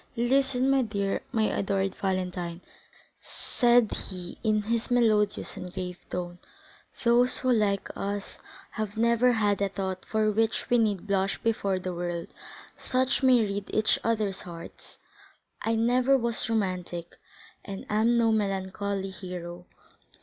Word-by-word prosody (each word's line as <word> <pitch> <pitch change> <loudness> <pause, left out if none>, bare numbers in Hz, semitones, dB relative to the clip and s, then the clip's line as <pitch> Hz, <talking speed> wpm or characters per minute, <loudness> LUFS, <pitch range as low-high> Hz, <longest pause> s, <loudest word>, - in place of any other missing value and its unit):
"Listen, 260 +1 +2
my 270 -1 +4
dear, 200 -4 -1
my 225 -3 +1
adored 195 -2 0
Valentine," 180 -2 -3 0.6
said 240 -2 +2
he 180 -2 -6
in 215 -2 +2
his 230 +1 -1
melodious 215 -4 +2
and 180 - -7
grave 180 -1 -5
tone; 175 0 -4 0.6
"those 240 +1 +4
who, 255 - +1
like 205 -4 +2
us, 200 0 -4 0.3
have 215 -1 -4
never 235 +2 +4
had 205 -3 +1
a 200 - +2
thought 190 -1 -4
for 215 -1 +1
which 225 +1 0
we 245 - +5
need 205 -4 +1
blush 195 -1 0
before 200 -4 +1
the 185 0 -4
world, 175 -1 -4 0.5
such 260 +2 0
may 255 -3 +5
read 200 -1 -2
each 215 0 +2
other's 215 -4 0
hearts. 170 -1 -11 0.6
I 225 0 0
never 250 +4 +3
was 235 -2 -1
romantic, 180 -5 -2 0.5
and 195 -1 -7
am 225 +3 +3
no 230 -1 +4
melancholy 195 -1 -1
hero. 180 -2 -7
205 Hz, 135 wpm, -28 LUFS, 190-230 Hz, 0.6 s, we